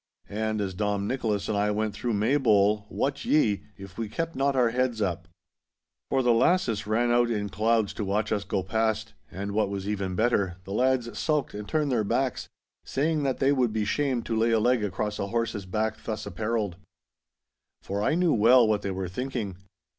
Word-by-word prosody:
And 110 0 -1
as 95 -2 -2
Dom 100 +1 -1
Nicholas 105 -6 -1
and 110 - -1
I 105 +1 +1
went 105 0 -1
through 120 +3 -2
Maybole, 105 -3 +3
wot 140 +1 -2
ye, 110 -10 +2
if 95 +1 -11
we 110 -2 -3
kept 165 +8 -3
not 140 +1 +1
our 125 -3 +4
heads 125 -2 0
up. 90 -4 -2 0.8
For 135 -1 +2
the 120 -1 +4
lasses 115 - +2
ran 120 +3 +2
out 120 0 +3
in 105 -3 -1
clouds 110 +2 +1
to 110 - -4
watch 105 +2 -1
us 105 -2 0
go 95 -1 -2
past, 110 +2 -1 0.2
and 100 +3 -5
what 105 -1 +1
was 100 0 -4
even 100 -3 -2
better, 100 -5 +1
the 95 - -7
lads 125 -1 +1
sulked 150 -3 0
and 105 0 -7
turned 150 -3 +1
their 115 -4 +2
backs, 130 +5 -1 0.4
saying 155 +2 0
that 135 -2 0
they 135 0 +3
would 125 -5 +2
be 110 -1 0
shamed 130 0 0
to 115 - -2
lay 115 +1 +2
a 115 -1 +3
leg 120 0 +2
across 105 +1 -2
a 100 - -1
horse's 110 -3 -2
back 110 +3 -2
thus 110 -1 -4
appareled. 105 -1 -2 1.1
For 100 +1 -3
I 125 - +2
knew 175 -2 +3
well 120 +2 +6
what 105 -1 +1
they 100 - -3
were 95 -1 -3
thinking. 115 -1 -4
110 Hz, 200 wpm, -27 LUFS, 100-125 Hz, 1.1 s, well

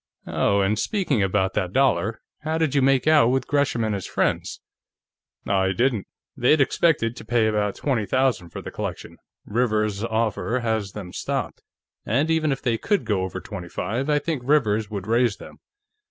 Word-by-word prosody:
Oh, 100 0 +1
and 105 +2 +1
speaking 175 - 0
about 95 0 +1
that 90 0 -2
dollar; 115 -6 +1 0.2
how 155 +1 -2
did 160 -4 +1
you 140 - +3
make 135 0 +3
out 155 -6 +5
with 130 +2 +1
Gresham 140 -5 +1
and 110 -1 0
his 95 -3 -4
friends?" - - -1 0.9
"I 95 -1 +2
didn't. 120 -3 0 0.3
They'd 135 +4 +3
expected 135 -4 +2
to - - -9
pay 115 0 +2
about 105 -2 0
twenty 120 -8 -1
thousand 130 -6 +1
for - - -8
the - - -7
collection; - - -6 0.3
Rivers's 105 -2 0
offer 115 +2 -1
has 110 -4 -1
them 95 -4 -8
stopped. - - -3 0.4
And 140 +9 +1
even 160 -2 +2
if 135 - -3
they 115 -3 0
could 205 -1 0
go 100 -4 0
over 95 0 -4
twenty 95 -3 -8
five, 130 - -3
I 150 - +3
think 145 -2 -2
Rivers 110 -7 +2
would 100 -3 -5
raise 115 -1 +2
them. - - -12
115 Hz, 180 wpm, -24 LUFS, 105-135 Hz, 0.9 s, out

